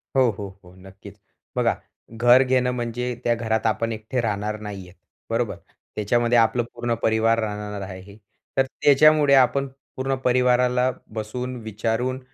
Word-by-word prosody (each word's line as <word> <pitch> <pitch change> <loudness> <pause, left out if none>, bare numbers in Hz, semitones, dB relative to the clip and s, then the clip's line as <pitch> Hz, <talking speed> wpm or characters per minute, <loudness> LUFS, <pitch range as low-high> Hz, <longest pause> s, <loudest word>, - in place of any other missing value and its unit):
हो, 130 -2 +4
हो, 100 - -5 0.2
हो, 90 0 -16
नक्कीच. 95 +1 -14 0.4
बघा, - - +2 0.4
घर 120 +3 +5
घेणं 130 -1 +1
म्हणजे 125 0 -3
त्या 120 - +2
घरात 110 -1 -1
आपण 115 +2 0
एकटे 110 +3 -3
राहणार 105 -1 -2
नाही 100 -3 -8
आहेत, 90 - -17 0.3
बरोबर, - - -1 0.4
त्याच्यामध्ये 120 +3 +2
आपलं 115 +1 +3
पूर्ण 120 0 -2
परिवार 115 +1 +2
राहणार 105 -2 -4
आहे. 95 +1 -9 0.4
तर 135 - +4
त्याच्यामुळे 145 +2 +4
आपण 135 +1 +3 0.3
पूर्ण 135 +1 -1
परिवाराला 125 0 +3 0.2
बसून, 125 +4 -4
विचारून 115 +4 -2
115 Hz, 140 wpm, -23 LUFS, 105-125 Hz, 0.4 s, घर